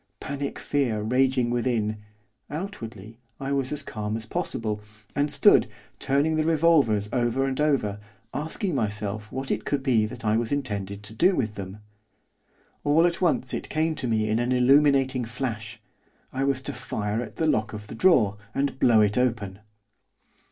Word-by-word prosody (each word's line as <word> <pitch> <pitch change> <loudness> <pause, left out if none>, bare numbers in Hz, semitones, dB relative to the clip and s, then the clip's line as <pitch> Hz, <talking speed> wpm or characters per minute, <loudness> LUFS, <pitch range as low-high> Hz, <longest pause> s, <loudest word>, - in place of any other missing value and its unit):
Panic 140 0 -4
fear 130 -7 0
raging 125 +1 +2
within, 115 -3 0 0.5
outwardly 115 - -7 0.2
I 135 0 -3
was 135 -2 0
calm 105 -3 -3
as 110 - -6
possible, 110 -1 -3 0.3
and 145 +1 +1
stood, 205 - +5 0.3
turning 145 +4 +1
the 155 - +2
revolvers 155 -10 +3
over 125 +2 +1
and 135 +1 -1
over, 120 -9 +1 0.3
asking 160 +5 -2
myself 105 -3 -2
what 135 +1 -3
it - - -1
could 140 -2 -1
be 115 -6 +3
that 110 - -8
I 105 +1 +3
was 115 -1 -1
intended 100 -8 -3
to 105 +1 -10
do 180 - +3
with 110 -7 -1
them. 100 0 -8 1.0
All 150 +3 +4
at 170 0 0
once 155 -7 +1
it - - -4
came 160 +1 +1
to 155 -5 -3
me 110 -2 +1
in 110 +1 +1
an 120 +1 0
illuminating 135 0 +4
flash, 115 -2 -4 0.5
I 135 +1 0
was 135 -1 +1
to - - -5
fire 105 +2 -3
at - - -8
the 160 - 0
lock 110 -8 +1
of 105 -1 -7
the - - -9
drawer, 115 - +4 0.2
and 135 -1 -1
blow 115 -3 +5
it 105 +3 +2
open. 110 -6 -1
125 Hz, 165 wpm, -26 LUFS, 110-140 Hz, 1.0 s, stood